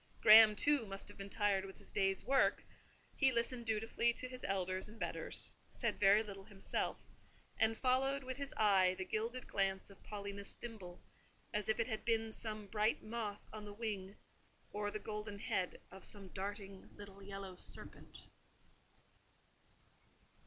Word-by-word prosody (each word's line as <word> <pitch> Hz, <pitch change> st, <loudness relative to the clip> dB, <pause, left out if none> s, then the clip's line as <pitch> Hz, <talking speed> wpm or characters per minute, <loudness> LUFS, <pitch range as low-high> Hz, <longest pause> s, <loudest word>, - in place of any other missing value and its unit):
Graham, 215 Hz, 0 st, +10 dB
too, 285 Hz, -2 st, +4 dB
must 195 Hz, 0 st, -6 dB
have 205 Hz, -, -11 dB
been 195 Hz, 0 st, -6 dB
tired 205 Hz, -2 st, +1 dB
with 195 Hz, -1 st, -9 dB
his -, -, -8 dB
day's 195 Hz, -1 st, +2 dB
work: 270 Hz, 0 st, +3 dB, 0.5 s
he 270 Hz, -2 st, +4 dB
listened 235 Hz, 0 st, -1 dB
dutifully 225 Hz, +2 st, +1 dB
to 255 Hz, -, -2 dB
his 255 Hz, 0 st, -8 dB
elders 190 Hz, 0 st, 0 dB
and 220 Hz, +1 st, -13 dB
betters, -, -, -1 dB, 0.2 s
said -, -, -2 dB
very 205 Hz, +1 st, +6 dB
little 195 Hz, -2 st, -9 dB
himself, 200 Hz, -2 st, -2 dB, 0.6 s
and 220 Hz, 0 st, +3 dB
followed 270 Hz, +2 st, +2 dB
with 260 Hz, 0 st, -5 dB
his 280 Hz, -1 st, -4 dB
eye 190 Hz, -4 st, +4 dB
the 190 Hz, -, -3 dB
gilded 230 Hz, +6 st, -2 dB
glance 195 Hz, 0 st, -1 dB
of 195 Hz, -, -17 dB
Paulina's 200 Hz, -1 st, -6 dB
thimble; 195 Hz, -7 st, -8 dB, 0.5 s
as 210 Hz, 0 st, -1 dB
if 220 Hz, -, +2 dB
it 230 Hz, -, +3 dB
had 220 Hz, -3 st, -4 dB
been 225 Hz, -1 st, +1 dB
some 215 Hz, -1 st, -3 dB
bright 215 Hz, +2 st, 0 dB
moth 215 Hz, -2 st, -4 dB
on 215 Hz, -1 st, -6 dB
the 205 Hz, 0 st, -8 dB
wing, 205 Hz, -3 st, -4 dB, 0.6 s
or 205 Hz, 0 st, -2 dB
the 210 Hz, -, -4 dB
golden 210 Hz, -1 st, -5 dB
head 185 Hz, -2 st, -2 dB
of 190 Hz, 0 st, -11 dB
some 200 Hz, -2 st, -5 dB
darting 195 Hz, 0 st, -6 dB
little 200 Hz, -1 st, -11 dB
yellow 195 Hz, -1 st, -7 dB
serpent. -, -, -7 dB
210 Hz, 160 wpm, -37 LUFS, 195-225 Hz, 0.6 s, Graham